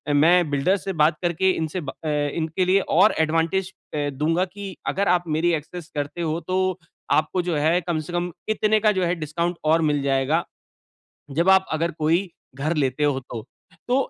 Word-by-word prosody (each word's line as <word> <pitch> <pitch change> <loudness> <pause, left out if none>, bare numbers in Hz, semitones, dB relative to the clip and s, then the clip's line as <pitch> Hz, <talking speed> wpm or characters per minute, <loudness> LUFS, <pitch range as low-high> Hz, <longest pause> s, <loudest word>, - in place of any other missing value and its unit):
मैं 170 +2 +4
बिल्डर 145 +8 +2
से 195 0 -5
बात 155 +1 +4
करके 175 +2 +2
इनसे 165 +1 -3
ब 140 - -6
अ, 155 - -8
इनके 155 +4 -1
लिए 190 +2 +4 0.2
और 210 +3 +6
एडवांटेज 165 +4 +1 0.2
ए, 145 -1 0
दूँगा 165 +6 +1
कि 195 +1 -8
अगर 200 +1 0
आप 175 0 +3
मेरी 175 +1 +2
एक्सेस 160 +2 -5
करते 145 +3 -3
हो 160 0 -1
तो 185 0 0 0.4
आपको 155 +4 0
जो 165 - 0
है 160 +4 +3
कम 165 -2 -2
से 175 - -7
कम 175 0 -1 0.2
इतने 215 0 +2
का 210 - +6
जो 180 - +1
है 175 - 0
डिस्काउंट 170 +2 -2
और 160 +2 +4
मिल 145 - 0
जाएगा। 140 +4 +1 0.9
जब 170 +6 +2
आप 190 0 +6
अगर 165 +2 0
कोई 170 +5 +1 0.3
घर 155 +5 -1
लेते 135 0 0
हो 145 -2 +2
तो। 120 -4 -8 0.4
तो 245 - +2
165 Hz, 190 wpm, -23 LUFS, 150-185 Hz, 0.9 s, और